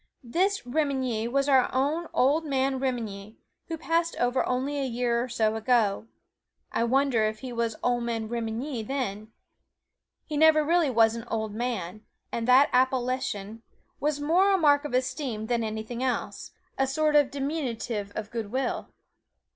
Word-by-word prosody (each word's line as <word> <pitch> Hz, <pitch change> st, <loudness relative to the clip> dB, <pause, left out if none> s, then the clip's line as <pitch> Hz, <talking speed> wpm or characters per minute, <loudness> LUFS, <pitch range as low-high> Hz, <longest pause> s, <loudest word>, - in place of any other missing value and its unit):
This 370 Hz, +11 st, 0 dB
Remenyi 255 Hz, -5 st, -1 dB
was 275 Hz, +1 st, +1 dB
our 265 Hz, -3 st, +4 dB
own 295 Hz, +6 st, 0 dB
"Ol' 285 Hz, +5 st, +3 dB
Man 270 Hz, -3 st, 0 dB
Remenyi," 220 Hz, -5 st, -4 dB, 0.3 s
who 330 Hz, -, -4 dB
passed 330 Hz, +1 st, 0 dB
over 245 Hz, +1 st, +1 dB
only 265 Hz, +3 st, -1 dB
a -, -, 0 dB
year 240 Hz, -2 st, 0 dB
or 255 Hz, -, -6 dB
so 220 Hz, -2 st, +1 dB
ago. 220 Hz, -2 st, +1 dB, 0.6 s
I -, -, 0 dB
wonder 260 Hz, -2 st, +2 dB
if 215 Hz, 0 st, -3 dB
he 255 Hz, -2 st, -6 dB
was 230 Hz, -2 st, -1 dB
Ol' 245 Hz, -1 st, +1 dB
Man 230 Hz, -2 st, -2 dB
Remenyi 235 Hz, +3 st, -3 dB
then! 215 Hz, -4 st, -3 dB, 1.0 s
He 300 Hz, -, -4 dB
never 310 Hz, 0 st, +6 dB
really 335 Hz, -1 st, +3 dB
was 225 Hz, -2 st, +4 dB
an 230 Hz, 0 st, -6 dB
old 220 Hz, -2 st, -3 dB
man, 215 Hz, -4 st, -3 dB, 0.3 s
and 230 Hz, 0 st, -3 dB
that 260 Hz, +3 st, +6 dB
appellation 250 Hz, -4 st, 0 dB, 0.4 s
was 295 Hz, 0 st, 0 dB
more 350 Hz, +7 st, +3 dB
a 390 Hz, -, +4 dB
mark 290 Hz, -3 st, +4 dB
of 285 Hz, -, -2 dB
esteem 255 Hz, -3 st, -2 dB
than 235 Hz, 0 st, 0 dB
anything 220 Hz, +2 st, -4 dB
else 260 Hz, -1 st, -2 dB, 0.3 s
a 270 Hz, -, +3 dB
sort 300 Hz, +3 st, +1 dB
of 290 Hz, -2 st, +5 dB
diminutive 250 Hz, -8 st, -3 dB
of 215 Hz, 0 st, -5 dB
good 225 Hz, -3 st, -4 dB
will. 260 Hz, 0 st, -2 dB
250 Hz, 160 wpm, -27 LUFS, 225-280 Hz, 1.0 s, never